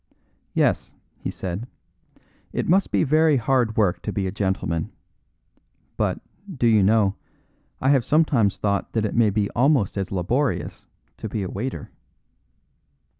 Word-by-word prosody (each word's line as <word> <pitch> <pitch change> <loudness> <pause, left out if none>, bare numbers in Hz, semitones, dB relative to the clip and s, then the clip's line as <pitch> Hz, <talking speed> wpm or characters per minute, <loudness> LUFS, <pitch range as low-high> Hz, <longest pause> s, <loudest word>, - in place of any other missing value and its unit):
"Yes," - - +1 0.2
he - - -4
said; 95 +6 -5 0.8
"it - - -2
must 190 +4 +3
be - - +2
very 155 0 +4
hard 120 -2 +1
work 100 -5 +2
to - - -3
be 100 - -2
a 95 - -2
gentleman; 95 -5 -2 1.0
but, - - -1 0.4
do 120 - +1
you 110 -3 +5
know, 100 0 +3 0.7
I 130 - +1
have 135 -4 +3
sometimes 130 -9 +2
thought 100 -1 -1
that 110 -2 +1
it 105 - -2
may 115 -2 +4
be 100 0 0
almost 125 -6 +2
as 95 - -4
laborious 115 - -1 0.3
to - - -6
be 105 - -3
a 95 - -4
waiter." 125 +6 -5
110 Hz, 145 wpm, -23 LUFS, 100-130 Hz, 1.0 s, you